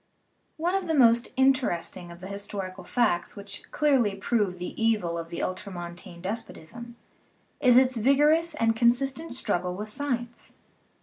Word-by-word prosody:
One 340 Hz, +3 st, 0 dB
of 385 Hz, -2 st, -1 dB
the 320 Hz, -, +1 dB
most 235 Hz, -3 st, +4 dB
interesting 255 Hz, -10 st, +1 dB
of 170 Hz, 0 st, -12 dB
the 185 Hz, -, -7 dB
historical 195 Hz, -2 st, -6 dB
facts 215 Hz, -3 st, 0 dB
which 200 Hz, -1 st, -8 dB
clearly 265 Hz, -9 st, +2 dB
prove 195 Hz, -2 st, 0 dB
the 180 Hz, -, -5 dB
evil 210 Hz, -7 st, +1 dB
of 165 Hz, 0 st, -5 dB
the 170 Hz, -, -4 dB
ultramontane 175 Hz, -1 st, -6 dB
des 215 Hz, +5 st, -1 dB
potism 235 Hz, +5 st, -11 dB, 0.6 s
is 250 Hz, -2 st, +5 dB
its 255 Hz, -1 st, +4 dB
vigorous 300 Hz, +7 st, +3 dB
and 225 Hz, -5 st, +2 dB
consistent 255 Hz, +5 st, +1 dB
struggle 180 Hz, -7 st, -1 dB
with 210 Hz, +3 st, -6 dB
sci 285 Hz, +7 st, -4 dB
ence. 240 Hz, 0 st, -11 dB
225 Hz, 150 wpm, -27 LUFS, 185-260 Hz, 0.6 s, is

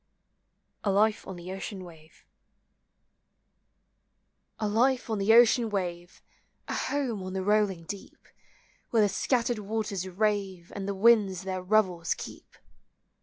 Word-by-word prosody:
A 205 Hz, -, +1 dB
LIFE 210 Hz, +2 st, +2 dB
ON 190 Hz, -, -6 dB
THE 175 Hz, +1 st, -8 dB
OCEAN 195 Hz, 0 st, -6 dB
WAVE. 160 Hz, -3 st, -16 dB, 2.3 s
A 215 Hz, -, -1 dB
life 245 Hz, +3 st, +1 dB
on 215 Hz, -, -1 dB
the 200 Hz, +3 st, +3 dB
ocean 235 Hz, -1 st, +5 dB
wave, 175 Hz, -3 st, -4 dB, 0.4 s
A -, -, -3 dB
home 260 Hz, -8 st, -2 dB
on 185 Hz, 0 st, -6 dB
the 190 Hz, -1 st, -2 dB
rolling 205 Hz, -4 st, +1 dB
deep; 195 Hz, +4 st, -9 dB, 0.6 s
Where 225 Hz, -2 st, +3 dB
the 205 Hz, -, +3 dB
scattered 240 Hz, +2 st, 0 dB
waters 210 Hz, -3 st, -3 dB
rave, 195 Hz, -3 st, -1 dB
And 200 Hz, -1 st, -4 dB
the 200 Hz, -, -2 dB
winds 200 Hz, -3 st, +4 dB
their 190 Hz, -1 st, -3 dB
revels 185 Hz, -4 st, +1 dB
keep! -, -, -10 dB
200 Hz, 130 wpm, -28 LUFS, 185-220 Hz, 2.3 s, ocean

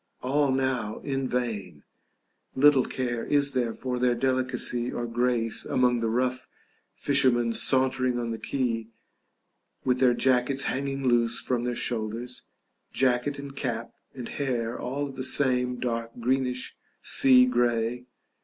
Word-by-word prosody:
All 140 Hz, +2 st, +1 dB
now 130 Hz, -5 st, -1 dB
in 135 Hz, -2 st, -2 dB
vain: 115 Hz, -8 st, -3 dB, 0.7 s
little 140 Hz, -1 st, +5 dB
care 120 Hz, -3 st, -3 dB
is 140 Hz, -1 st, +1 dB
there 120 Hz, -3 st, 0 dB
for 125 Hz, +2 st, -4 dB
their 125 Hz, -1 st, +2 dB
delicacy 130 Hz, -1 st, -1 dB
or 120 Hz, -, -3 dB
grace 120 Hz, -1 st, 0 dB
among 125 Hz, -1 st, +1 dB
the 115 Hz, -1 st, -1 dB
rough 125 Hz, +2 st, -1 dB, 0.5 s
fishermen 120 Hz, -4 st, +2 dB
sauntering 130 Hz, 0 st, +1 dB
on 120 Hz, -1 st, -3 dB
the 115 Hz, -, -5 dB
quay 115 Hz, -4 st, -2 dB, 1.0 s
with 125 Hz, -1 st, +1 dB
their 125 Hz, -2 st, +4 dB
jackets 130 Hz, +2 st, +1 dB
hanging 135 Hz, 0 st, -2 dB
loose 120 Hz, -1 st, +2 dB
from 120 Hz, -1 st, -1 dB
their 125 Hz, -1 st, -2 dB
shoulders, 120 Hz, +2 st, -3 dB, 0.5 s
jacket 130 Hz, +2 st, +1 dB
and 140 Hz, -1 st, -8 dB
cap 120 Hz, -4 st, -3 dB, 0.2 s
and 125 Hz, -3 st, -6 dB
hair 120 Hz, -4 st, -2 dB
all 140 Hz, +3 st, -3 dB
of 135 Hz, -, -10 dB
the 130 Hz, -, -4 dB
same 125 Hz, -2 st, +2 dB
dark 115 Hz, -1 st, -3 dB
greenish 125 Hz, +1 st, -1 dB, 0.3 s
sea 130 Hz, -1 st, +6 dB
grey. 120 Hz, 0 st, 0 dB
125 Hz, 135 wpm, -26 LUFS, 120-130 Hz, 1.0 s, sea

